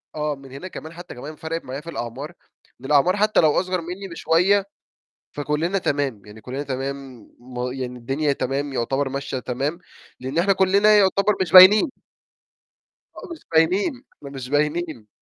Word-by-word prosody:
آه. 150 -1 -2
من 135 -1 -14
هنا 140 +8 -8
كمان 160 -3 -9
حتى 175 +1 -10
كمان 145 +5 -8
فَرَقت 165 +1 -5
معايا 130 +3 -6
في 165 - -10
الأعمار، 135 +4 -6 0.5
إن 135 - -11
الأعمار 150 +7 +3
حتى 215 +1 +3
لو 155 -2 +5
أصغر 185 -1 -2
مني 180 +4 -7
بشوية 180 +5 +2 0.7
فكلنا 150 +6 -1
تمام، 140 - -2
يعني 105 +1 -13
كلنا 130 +5 -5
تمام 135 -2 -6 0.5
يعني 125 -2 -5
الدنيا 140 +5 -1
تمام 140 +1 -3
يعتبر 135 +3 -1
ماشية 135 -1 -4
تمام، 135 +7 -3 0.4
لإن 130 +4 -5
احنا 195 +4 +3
كلنا 200 +3 +4
يعتبر 200 +1 +3
مش 180 -4 -1
باينين. 195 - +9 1.3
آه - - -10
مش 330 - -14
باينين، 190 - +2 0.2
مش 135 -3 -8
باينين. 150 -4 -1
150 Hz, 155 wpm, -22 LUFS, 135-180 Hz, 1.3 s, باينين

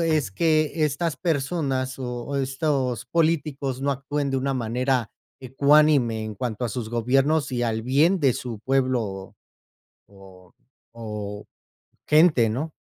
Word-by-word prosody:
es 155 -10 +1
que 155 - +1
estas 150 +2 -1
personas 135 -5 -1
o 125 +2 -4
estos 135 -3 -1
políticos 145 -5 0
no 140 - +1
actúen 140 +1 -2
de 135 - 0
una 135 +1 -1
manera 125 0 -1 0.3
ecuánime 135 -3 +3
en 110 -1 -6
cuanto 120 +1 -3
a 120 - -1
sus 115 0 -4
gobiernos 135 +6 +1
y 120 -1 -1
al 110 -1 -1
bien 150 +10 +3
de 135 -4 +4
su 120 -4 -6
pueblo 130 -1 +1
o 95 -2 -7 0.7
o 95 -2 -17 0.4
o 105 -3 -6 0.6
gente, 150 -7 +5
¿no? 140 +8 -3
130 Hz, 135 wpm, -24 LUFS, 115-150 Hz, 0.7 s, gente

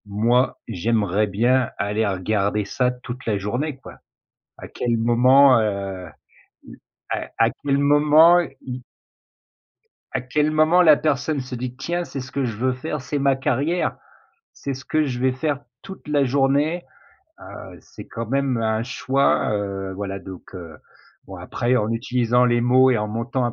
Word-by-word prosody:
Moi 115 +5 +1
j'aimerais 105 +1 0
bien 120 +5 +1
aller 105 +2 -1
regarder 100 +2 -1
ça 125 +5 0
toute 125 +1 -8
la 105 -2 +1
journée, 125 +9 -3
quoi. 135 - -13 0.6
À - - -10
quel 120 -1 -1
moment, 125 +3 +5
heu 100 -4 -3 1.0
à - - -3
à 115 - +4
quel 140 -1 +1
moment 150 +4 +5 0.2
y 125 0 -7 1.3
à - - 0
quel 150 +5 0
moment 155 +3 +4
la 155 -4 +6
personne 145 0 -1
se 125 -1 -6
dit: 125 0 -5
«Tiens, 175 +5 -2
c'est 140 - -7
ce 130 0 -8
que 140 - -1
je 115 -4 -4
veux 130 +3 0
faire, 150 +3 -5
c'est 145 +3 -3
ma 140 -1 +2
carrière. 145 +6 -1 0.6
C'est 140 - -5
ce 130 0 -10
que 155 0 +1
je 125 -3 -4
vais 130 0 +1
faire 145 +1 -2 0.2
toute 190 -4 -11
la 145 -2 +2
journée, 140 +5 +1 0.6
heu» - - -11
c'est - - -13
quand 115 0 -6
même 135 +1 0
un 110 0 0
choix, 135 +2 +1
heu, 100 -2 -3
voilà 100 0 -5
donc 95 0 -11
heu, 85 -4 -9 0.5
bon - - -9
après 125 +2 -1
en 105 -2 0
utilisant 120 +1 +1
les 120 -1 +2
mots 130 +2 +4
et 120 - +2
en 105 0 -2
montant 120 +4 -2
un 120 - -1
125 Hz, 165 wpm, -22 LUFS, 110-140 Hz, 1.3 s, la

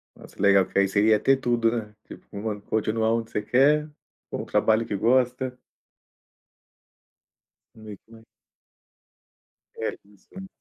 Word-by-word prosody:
Nossa - - -16
legal, 100 -1 +5
que - - -6
aí 100 - +3
seria 105 +2 +3
ter 135 +5 +3
tudo, 120 -3 +1
né, 105 -2 -5
tipo - - -13
uma 105 0 -5
continuar 110 +1 -1
onde 115 0 -3
você 105 - -2
quer, 150 +6 +2 0.4
com - - -4
o - - -10
trabalho 110 +1 +1
que 100 - -4
gosta. 125 +3 0 2.2
Mesmo 110 +1 -13
a 110 - -20 1.5
É, - - -4
isso 100 -1 -25
sim. 190 0 -9
110 Hz, 135 wpm, -25 LUFS, 105-125 Hz, 2.2 s, legal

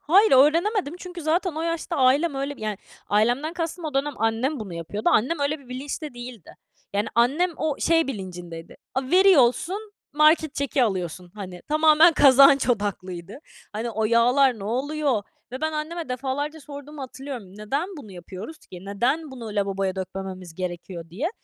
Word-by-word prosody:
Hayır, 395 +8 +4
öğrenemedim 330 - +4
çünkü 360 -2 -8
zaten 340 +3 +1
o 320 - -3
yaşta 335 0 -2
ailem 275 +4 +3
öyle 275 +1 -3
yani, 215 -2 -4 0.3
ailemden 245 +10 +2
kastım 335 0 -4
o 300 - -4
dönem 280 +1 0
annem 225 +5 0
bunu 190 -5 -6
yapıyordu. 170 +6 -2
Annem 270 +9 +2
öyle 290 +2 0
bir 265 -3 -18
bilinçte 275 +2 -5
değildi. 240 -6 -10 0.4
Yani, 205 +2 0
annem 275 +10 +3
o, 305 -2 -1
şey 330 -2 +3
bilincindeydi, 175 -7 -7 0.2
"A, 265 - 0
veriyorsun, 375 - +4 0.2
market 305 0 +4
çeki 280 -1 0
alıyorsun." 180 -3 -3
Hani, 185 -4 -8
tamamen 310 +2 +6
kazanç 275 -1 +6
odaklıydı. 190 -3 -3 0.3
Hani, 225 +3 -3
o 220 0 -1
yağlar 240 +2 +4
ne 195 - -7
oluyor 265 +1 0 0.3
ve 255 - -5
ben 315 0 -1
anneme 315 0 -4
defalarca 280 +4 -3
sorduğumu 285 0 -9
hatırlıyorum, 265 -2 -7
"Neden 275 - -2
bunu 215 -9 -10
yapıyoruz 190 - -9
ki? 180 -1 -12
Neden 260 +10 -1
bunu 245 -3 -8
lavaboya 195 -2 -1
dökmememiz 185 -2 -6
gerekiyor?" 175 -2 -6
diye. 260 - -2
265 Hz, 155 wpm, -24 LUFS, 205-310 Hz, 0.4 s, tamamen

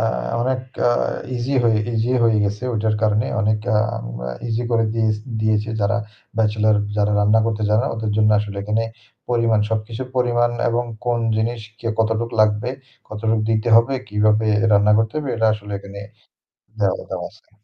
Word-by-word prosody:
আ - - 0 0.4
অনেক 130 +1 0 0.3
আ - - +3 0.5
ইজি 125 +4 -2
হয়ে 110 -2 +3
ইজি 115 +2 0
হয়ে 115 -1 +4
গেছে 105 +3 -3
ওইটার 110 -1 0
কারণে 110 0 +2
অনেক 110 0 +1 0.2
আ - - +4 0.7
ইজি 115 +1 -1
করে 115 -1 +2
দিয়েছ 110 -2 +1 0.2
দিয়েছে 110 0 +1
যারা 100 - +1 0.4
ব্যাচেলর 110 -1 +2 0.2
যারা 105 0 +2
রান্না 105 +2 +4
করতে 110 -1 -2
জানে 105 +2 +3
না - - -1
ওদের 110 -1 -3
জন্য 110 0 +4
আসলে 105 -1 -4
এখানে 105 +2 0 0.5
পরিমাণ 115 -3 +2
সবকিছু 110 +2 -3
পরিমাণ 120 -1 +2 0.2
এবং 120 +1 0 0.2
কোন 120 -1 +1 0.2
জিনিস 115 +1 -1 0.2
কে, 115 - -7
কতটুকু 115 +1 0
লাগবে? 105 +2 +2 0.4
কতটুক 110 +1 -1
দিতে 110 +1 +1
হবে? 115 +4 +4
কীভাবে 105 +1 +2 0.3
রান্না 105 +1 +5
করতে 110 -1 0
হবে? 150 -2 -4
এটা 110 0 +2
আসলে 105 -1 -9
এখানে 100 0 -10 0.8
দেওয়ালে 100 -3 0
দেওয়া - - -4
আছে। - - -24
110 Hz, 165 wpm, -21 LUFS, 105-115 Hz, 0.8 s, রান্না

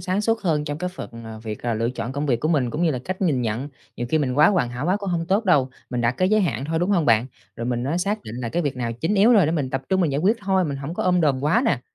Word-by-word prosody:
sáng 190 +2 -1
suốt 225 +1 0
hơn 155 -5 0
trong 145 0 -4
cái 180 +2 -2
phần, 180 - -8
à, 110 -1 -8
việc, 110 -2 -6
à, 120 -2 -1
lựa 115 +2 0
chọn 125 0 -5
công 145 +2 -2
việc 120 -4 +1
của 155 - 0
mình 135 -7 +1
cũng 155 +3 -2
như 165 - +3
là 130 - -2
cách 185 +1 -4
nhìn 145 -8 +1
nhận. 120 +5 -2 0.3
Nhiều 120 - -3
khi 155 - +3
mình 130 -4 0
quá 155 - +7
hoàn 160 -12 +1
hảo 125 +6 -4
quá 185 +3 +2
cũng 200 -3 -4
hông 165 -1 -1
tốt 200 +5 +1
đâu, 140 -8 +3 0.2
mình 125 -1 -1
đặt 120 +1 +2
cái 185 - +2
giới 215 +1 +3
hạn 135 - -1
thôi, 160 +2 -1
đúng 175 +4 0
không 175 -6 +2
bạn? 115 +1 +4 0.3
Rồi 115 - -4
mình 120 0 -1
á 160 +6 -1
xác 205 +4 -1
định 110 - -8
là 120 -2 -3
cái 175 +8 -1
việc 140 -3 -2
nào 120 -2 -2
chính 160 - -1
yếu 215 +4 +5
rồi 195 -9 +5
để 160 - 0
mình 140 -6 -1
tập 135 0 -2
trung 190 0 +2
mình 160 -6 +1
giải 140 - 0
quyết 210 +6 +3
thôi, 190 -2 +1
mình 145 -4 -3
hổng 140 +5 -6
có - - -2
ôm 180 -1 +2
đồm 135 -4 +1
quá 225 - +3
nè. 145 - +1
150 Hz, 340 wpm, -23 LUFS, 125-185 Hz, 0.3 s, quá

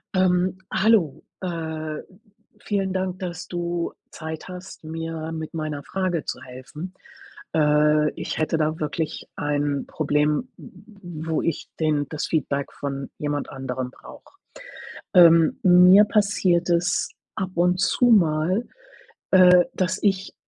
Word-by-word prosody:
Ähm, 185 0 +2 0.2
hallo, 190 -7 +2 0.2
äh, 160 -3 -4 0.6
vielen 195 -2 -2
Dank, 185 0 -2
dass 175 -2 -6
du 175 -1 -3 0.2
Zeit 160 0 -7
hast, 180 -1 -10
mir 160 0 -5
mit 160 0 -6
meiner 155 -3 -4
Frage 185 -2 -2
zu - - -5
helfen. 130 +8 -9 0.6
Äh, 150 0 +3
ich - - -5
hätte 160 +1 0
da 155 0 -1
wirklich 155 +1 -3
ein 145 -1 -1
Problem, 150 - 0
w 180 -5 -10
wo 160 - +1
ich 165 - -3
den 150 -3 +1
das 155 -2 -3
Feedback 140 -3 -1
von 140 -1 -5
jemand 145 -1 -3
anderem 130 -1 -5
brauche. 380 - -15 0.8
Ähm, 165 -3 +6
mir 180 +2 +8
passiert 200 -5 +1
es 175 +1 +1 0.3
ab 190 0 -3
und 180 +1 +2
zu 245 - +2
mal, 185 0 +3 0.9
äh, 180 -1 +6
dass 185 +1 -1
ich 195 -2 0
165 Hz, 125 wpm, -23 LUFS, 150-185 Hz, 0.9 s, mir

